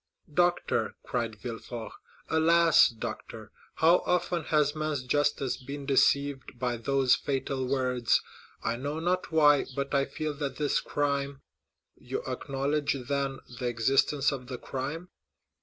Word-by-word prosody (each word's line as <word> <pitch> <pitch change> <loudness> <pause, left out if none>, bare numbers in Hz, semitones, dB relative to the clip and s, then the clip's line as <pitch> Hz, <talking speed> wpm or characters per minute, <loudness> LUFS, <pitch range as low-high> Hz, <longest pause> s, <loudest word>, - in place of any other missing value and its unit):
"Doctor," 175 +2 +1
cried - - -2
Villefort, - - -7 0.4
"alas, 165 0 +5
doctor, 115 -3 -7 0.2
how 165 +2 +5
often 175 -2 0
has 150 -1 +2
man's 155 -3 -2
justice 145 0 0
been 140 +2 -7
deceived 140 -1 +2
by 125 -1 -1
those 130 +2 +2
fatal 135 -1 -1
words. 125 -3 +2 0.4
I 115 - -1
know 145 +5 -3
not 180 +2 -1
why, 145 -3 +5
but 140 0 -3
I 140 -1 +3
feel 155 +1 -4
that 140 -2 -3
this 145 -2 +1
crime——" 140 -1 -2 0.5
"You - - -5
acknowledge, 140 +1 -1
then, 140 -1 -1 0.2
the 125 - -1
existence 135 +4 +2
of 130 -3 -6
the 130 - -5
crime?" 145 +9 -5
140 Hz, 130 wpm, -29 LUFS, 135-150 Hz, 0.5 s, alas